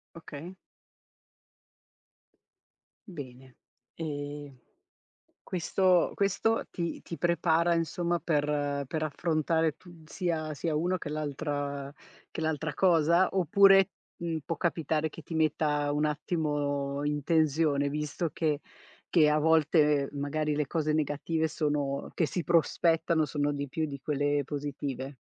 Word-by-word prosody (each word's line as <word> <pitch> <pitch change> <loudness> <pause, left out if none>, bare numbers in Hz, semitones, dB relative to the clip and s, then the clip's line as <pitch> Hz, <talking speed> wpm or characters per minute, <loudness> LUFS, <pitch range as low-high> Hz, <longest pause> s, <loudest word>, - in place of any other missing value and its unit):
Okay. 165 +2 -9 2.5
Bene. 130 -6 -10 0.4
Ehm, 145 -3 -5 0.9
questo 185 0 +2
questo 205 +3 +1
ti 170 -2 -3
ti 170 - -7
prepara, 170 0 +2
insomma, 170 +1 0
per 145 -2 0
per 155 +3 -3
affrontare 160 0 0
tu 170 -3 -16
sia 155 -2 -2
sia 155 +2 -2
uno 180 +4 +1
che - - -6
l'altra 145 -2 -3 0.4
che - - -6
l'altra 160 -1 -2
cosa, 170 0 +4
oppure, 195 +2 +5 0.3
mhmm, 165 -2 -3
può 165 - -3
capitare 160 -2 0
che 160 - -11
ti 165 - -8
metta 150 -2 +1
un 150 +1 +1
attimo 145 -2 -1
in 150 0 -1
tensione, 155 -3 +2
visto 150 +2 -2
che 150 -3 0 0.5
che 155 -4 +5
a 150 0 +3
volte, 155 -2 +4
ehm, 145 - -8
magari 150 +1 -1
le 150 -1 0
cose 155 -2 0
negative 155 +2 0
sono 145 -3 -1
che 165 - +1
si 175 +1 -3
prospettano 165 -1 +2
sono 145 0 -1
di 140 -1 -4
più 160 +3 -2
di 140 -1 -6
quelle 145 0 0
positive? 140 -1 -5
155 Hz, 125 wpm, -29 LUFS, 145-165 Hz, 2.5 s, oppure